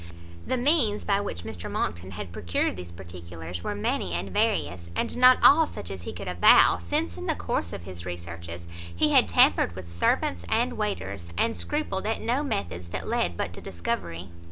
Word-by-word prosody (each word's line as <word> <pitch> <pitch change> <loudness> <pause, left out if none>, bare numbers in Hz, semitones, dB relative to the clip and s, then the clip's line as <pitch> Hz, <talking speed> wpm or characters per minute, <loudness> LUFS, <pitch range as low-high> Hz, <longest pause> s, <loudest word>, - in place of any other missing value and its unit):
The 255 - 0
means 245 -5 +3
by 200 -1 +1
which 85 - -5
Mr 90 -4 -6
Monckton 85 +2 -2
had 90 0 -6
procured 85 +1 -1
these 90 -1 -8
particulars 85 -1 -8
were 105 - -2
many 95 -3 -1
and 95 +2 -3
various, 85 -1 0
and - - -1
not 255 +1 +7
all 315 +2 +7
such - - -7
as 95 -2 -6
he - - -6
could 90 +2 -8
avow; 90 0 +6
since 85 0 -1
in 90 - -6
the - - +1
course 85 - -2
of - - -7
his 85 -1 -8
researches, 85 -1 -7 0.3
he - - +3
had - - +6
tampered 85 - +4
with 95 -2 -8
servants 85 +1 0
and 240 +3 +1
waiters, 100 - -3
and 230 0 +1
scrupled 295 -10 -2
at 220 - -1
no 245 +5 0
methods 90 - -3
that 85 - -5
led 85 -1 0
but 85 - -3
to - - -9
discovery. 85 -1 -4
90 Hz, 190 wpm, -26 LUFS, -, 0.3 s, not